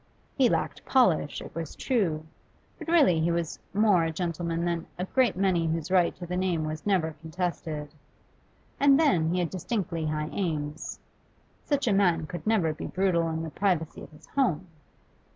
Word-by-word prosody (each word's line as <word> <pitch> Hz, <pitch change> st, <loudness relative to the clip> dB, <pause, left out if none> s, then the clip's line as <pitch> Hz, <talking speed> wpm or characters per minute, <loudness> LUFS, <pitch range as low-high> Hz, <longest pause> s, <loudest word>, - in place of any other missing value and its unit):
He 260 Hz, -3 st, +4 dB
lacked -, -, -1 dB
polish, 190 Hz, -, +2 dB
it -, -, -11 dB
was 165 Hz, -2 st, -5 dB
true, 175 Hz, -, 0 dB, 0.5 s
but -, -, -8 dB
really 295 Hz, -, +4 dB
he 160 Hz, +2 st, +1 dB
was 170 Hz, -1 st, -2 dB
more 205 Hz, -3 st, +4 dB
a 165 Hz, -, 0 dB
gentleman 170 Hz, 0 st, -2 dB
than 170 Hz, -1 st, -2 dB
a 180 Hz, -, -2 dB
great 250 Hz, +1 st, +2 dB
many 185 Hz, -3 st, +2 dB
whose 160 Hz, +1 st, -2 dB
right 180 Hz, -2 st, +3 dB
to 175 Hz, -, -8 dB
the 180 Hz, +1 st, -4 dB
name 180 Hz, -4 st, 0 dB
was 155 Hz, +4 st, -5 dB
never 180 Hz, -5 st, +2 dB
contested. 160 Hz, -3 st, -4 dB, 0.9 s
And 280 Hz, 0 st, +6 dB
then 180 Hz, -, +3 dB
he 180 Hz, -, 0 dB
had 170 Hz, -, -2 dB
distinctly 180 Hz, -4 st, -2 dB
high 150 Hz, 0 st, -2 dB
aims: 155 Hz, -5 st, -3 dB, 0.6 s
such 285 Hz, -3 st, 0 dB
a 215 Hz, -, +4 dB
man 175 Hz, -5 st, +3 dB
could 175 Hz, +6 st, -7 dB
never 190 Hz, -8 st, +2 dB
be -, -, -6 dB
brutal 175 Hz, -3 st, +1 dB
in 160 Hz, 0 st, -3 dB
the 160 Hz, -, -5 dB
privacy 175 Hz, -5 st, -1 dB
of -, -, -10 dB
his 155 Hz, 0 st, -17 dB
home. 190 Hz, -, +1 dB
170 Hz, 175 wpm, -27 LUFS, 160-195 Hz, 0.9 s, And